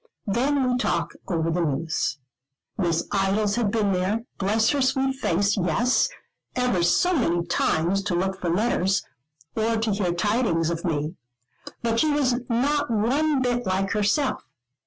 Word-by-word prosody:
Then 260 +6 +1
we 250 0 +1
talk 170 -7 0 0.2
over 165 -2 0
the 175 +2 0
news. 155 0 -1 0.6
Miss 170 -4 0
Idols 200 +1 +1
had 235 -4 +1
been 205 -2 +1
there, 190 +4 0 0.2
bless 215 +3 +2
her 285 -1 0
sweet 265 0 +1
face, 200 -3 +1
yes, 195 - +2 0.5
ever 250 -8 +1
so 355 - +3
many 175 - +1
times, 170 +2 +1
to 185 - 0
look 190 +2 -1
for 175 - -1
letters, 195 0 +1 0.5
or 225 +1 +1
to 220 0 0
hear 195 -3 0
tidings 175 -3 +1
of 170 0 -4
me. 155 0 -2 0.7
But 230 -1 +1
she 310 - +3
was 260 -4 +1
not 285 +5 +1
one 260 +6 +1
bit 245 -2 -1
like 190 +1 0
herself. 220 +7 0
205 Hz, 155 wpm, -24 LUFS, 175-245 Hz, 0.7 s, so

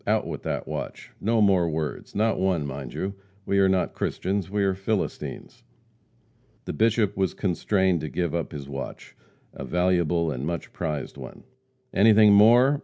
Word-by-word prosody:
Out - - +2
with - - -5
that - - -3
watch! - - -6
No 110 +2 +2
more 95 -4 +3
words 75 -2 -4
not 110 0 +1
one, 90 -5 +1
mind 70 -2 -6
you! 95 +1 -3 0.3
We 100 - +1
are 95 -1 +4
not 95 -1 +1
Christians, 95 -2 -2
we 100 0 0
are 95 -1 +2
Philistines." 95 +2 -4 1.0
The - - -4
Bishop 110 -2 +2
was 95 -1 0
constrained 95 -2 +1
to 75 - -4
give 85 0 -2
up 85 -1 -2
his 70 -3 -7
watch 70 -1 -7 0.4
a - - -7
valuable 90 -2 +1
and 65 -2 -4
much 85 +2 -4
prized 75 -5 -4
one. - - -10 0.5
"Anything 105 +1 +6
more? 120 +7 +6
95 Hz, 165 wpm, -25 LUFS, 80-105 Hz, 1.0 s, Anything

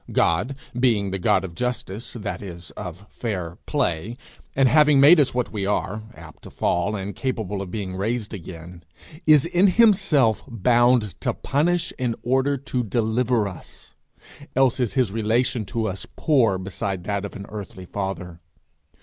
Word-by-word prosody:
God, 90 +12 +1 0.2
being 110 -6 +2
the 95 - -2
God 95 +1 +2
of 85 - -8
justice, 120 -1 -4
that 105 -3 -5
is 85 -3 -8
of 90 +3 -8
fair 90 -5 -4
play, 115 - -1 0.4
and 135 -1 +4
having 150 0 +5
made 150 +5 +8
us 140 -4 +2
what 125 -1 -1
we 105 -3 -3
are, 105 +1 -1
apt 85 -2 -13
to - - -11
fall 100 +5 0
and 100 0 -5
capable 110 -7 -3
of 95 - -6
being 95 -1 -4
raised 110 +3 -2
again, 85 -2 -9 0.4
is 150 -2 +6
in 175 +3 +3
himself 185 - +4
bound 120 -2 +3
to - - -1
punish 170 +4 0
in 120 -3 0
order 135 +3 +1
to 125 -2 -2
deliver 115 +1 +1
us 95 -4 -10 0.6
else 130 -1 +3
is 125 -4 0
his 125 -7 +2
relation 115 +2 0
to 110 +3 -2
us 95 +1 -5
poor 120 -11 +3
beside 95 0 -4
that 100 0 -2
of 100 - -7
an 100 - -7
earthly 100 -3 -8
father. 90 -3 -5
110 Hz, 160 wpm, -23 LUFS, 95-130 Hz, 0.6 s, made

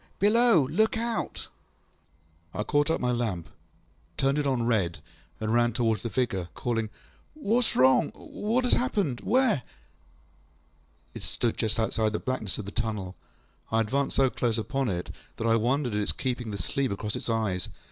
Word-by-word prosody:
Below 210 - +5
there! 150 - -7
Look 220 +1 +3
out! 230 0 -2 1.1
ŌĆÖ - - -4
I - - +1
caught 145 +5 +2
up 165 - +1
my 125 - +1
lamp, 110 -9 -2 0.7
turned 135 +2 +2
it 145 - 0
on 130 -3 +1
red, 105 -8 +1 0.4
and 110 0 -1
ran 120 0 +3
towards 115 -2 +1
the 115 - -3
figure, 100 -9 -1
calling, 115 -3 -1 0.5
ŌĆśWhatŌĆÖs 240 -4 +1
wrong? 130 0 +5
What 230 +5 -1
has 250 - +3
happened? 200 - +1
Where? 250 -2 +3
ŌĆÖ - - -8 1.5
It - - -7
stood 120 -2 -1
just 110 0 0
outside 110 -1 +1
the - - +1
blackness 110 -8 -2
of 105 - -5
the 100 - -6
tunnel. 105 -5 -3 0.6
I 110 - +3
advanced 135 +5 0
so 135 -2 +4
close 120 -2 0
upon 135 +3 -1
it 90 -2 -3 0.3
that 115 - -3
I 115 0 +4
wondered 125 +2 +1
at 105 - +1
its 105 - -1
keeping 125 -3 -2
the 100 - -4
sleeve 135 +3 -1
across 100 +1 -2
its - - -4
eyes. 110 -5 0
120 Hz, 180 wpm, -28 LUFS, 110-145 Hz, 1.5 s, Below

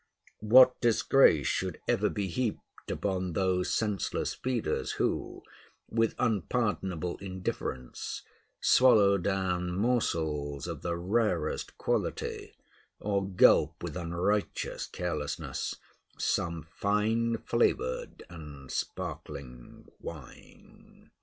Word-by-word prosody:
What 125 +4 +7
disgrace 115 - +4
should - - -1
ever - - +2
be 100 - -2
heaped 110 +5 -4
upon 95 -3 -2
those 90 0 +1
senseless 105 -6 -1
feeders 120 -10 -2
who, - - -2 0.5
with 115 0 +1
unpardonable 95 -5 -1
indifference, 90 -9 -5 0.4
swallow 105 -6 +5
down 90 -2 -1
morsels 80 - 0
of - - -5
the 85 -1 -2
rarest 90 -3 -1
quality, - - -2 0.4
or 100 -1 0
gulp 95 -2 +4
with - - -4
unrighteous 90 +3 -1
carelessness - - -3 0.4
some 85 -1 -1
fine 110 +6 0
flavored 65 - 0
and 75 -6 -10
sparkling 60 -3 -6
wine. 75 -6 -12
95 Hz, 90 wpm, -30 LUFS, 85-110 Hz, 0.5 s, What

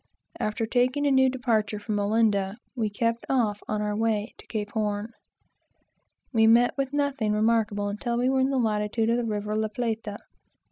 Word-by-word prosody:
After 215 +2 -1
taking 255 +5 +1
a 285 - +3
new 265 -1 +5
departure 230 -5 0
from 205 0 -2
Olinda, 205 -1 +1 0.2
we 225 -4 0
kept 230 +3 -1
off 220 -6 +1
on 215 0 -1
our 210 0 -1
way 220 -1 0
to - - -14
Cape 210 -2 -4
Horn. 210 0 -2 1.2
We 220 -1 +5
met 235 +3 +5
with 275 -1 -2
nothing 285 -7 0
remarkable 210 -2 +1
until 235 +4 -2
we 245 +1 +1
were 265 0 +2
in 260 +1 +2
the 275 - 0
latitude 220 -1 +1
of 235 - +2
the 245 - -1
river 210 -1 -2
La 220 0 0
Plata. 220 -2 -3
220 Hz, 180 wpm, -26 LUFS, 210-245 Hz, 1.2 s, new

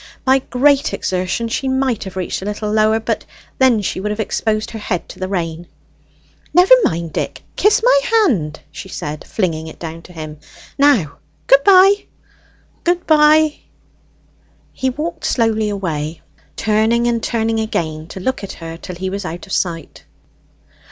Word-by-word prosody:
By 265 0 +5
great 275 +2 +2
exertion 185 +5 -2
she 250 +4 -2
might 260 -4 0
have 190 - -8
reached 185 0 -3
a - - -6
little 210 +1 -3
lower; 215 +1 +3
but 220 - -2 0.4
then 250 -5 +4
she 185 - -2
would 210 +2 -2
have 210 +1 -3
exposed 215 +1 -1
her 225 - -6
head 185 -4 -3
to - - -11
the 185 - -2
rain. 170 -3 -3 0.9
"Never 360 +6 +7
mind, 165 - -1
Dick; - - -4
kiss 420 +2 +3
my - - +5
hand," 245 - +1
she 180 +5 -9
said, 150 -3 -5
flinging 160 -6 -2
it 160 - -10
down 165 0 -7
to 180 - -15
him. 155 -3 -8 0.4
"Now, 275 - +3 0.3
good 275 +1 +5
bye." 390 +1 +6 0.8
"Good 350 0 0
bye." 305 0 +5 1.2
He 260 - -1
walked 320 +5 -5
slowly 220 -3 +1
away, 165 -6 -3 0.3
turning 220 +2 +2
and 235 -1 +1
turning 225 -1 0
again 160 -8 -3
to 190 - -8
look 260 +4 -2
at 200 - -6
her 165 0 -8
till 180 +1 -8
he 185 +2 -4
was 200 +1 -4
out 170 0 -6
of 195 - -8
sight. 170 -3 -3
215 Hz, 165 wpm, -18 LUFS, 175-265 Hz, 1.2 s, Never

